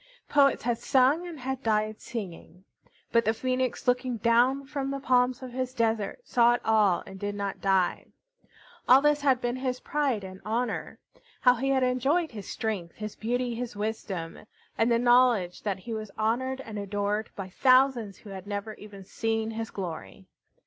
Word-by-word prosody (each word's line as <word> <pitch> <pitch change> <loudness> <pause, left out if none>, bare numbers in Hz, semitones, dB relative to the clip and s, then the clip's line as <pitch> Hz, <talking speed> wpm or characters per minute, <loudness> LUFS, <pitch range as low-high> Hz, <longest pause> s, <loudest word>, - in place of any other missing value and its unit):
Poets 280 -1 +3
had 240 -1 0
sung 275 +6 +3
and 330 -4 -8
had 265 +1 -3
died 215 -2 0
singing. 185 -4 -8 0.5
But 230 - +4
the 220 +1 +1
Phoenix, 255 +1 -2
looking 250 -1 +1
down 245 +5 +3
from 275 -1 -3
the 275 0 -3
palms 250 -1 +2
of 255 - -7
his 255 +1 -3
desert, 225 - 0
saw 240 - +4
it 245 - -5
all 210 -5 +3
and 195 0 -10
did 205 +1 -3
not 200 -1 -4
die. 190 -2 +1 0.8
All 265 +3 +8
this 295 0 +3
had 270 -3 +3
been 240 0 -2
his 255 -1 -2
pride 275 -8 -1
and 185 0 -9
honor. 230 +2 -2 0.4
How 250 - +6
he 265 +3 -2
had 265 -1 +2
enjoyed 270 +7 +1
his 205 -4 -8
strength, 195 -7 -3
his 215 -1 -6
beauty, 245 +2 -1
his 235 -1 -5
wisdom, 205 -5 -4 0.4
and 225 +1 +2
the 235 - +4
knowledge 240 -7 +3
that 200 -2 -2
he 225 +5 -7
was 215 -1 -5
honored 260 +5 0
and 220 -5 -7
adored 205 +2 -2
by 190 -2 -6
thousands 255 -2 +3
who 205 - -12
had 190 0 -8
never 205 +1 -4
even 205 -2 -12
seen 225 +2 -2
his 225 0 -4
glory! 160 - -7
230 Hz, 175 wpm, -28 LUFS, 205-255 Hz, 0.8 s, All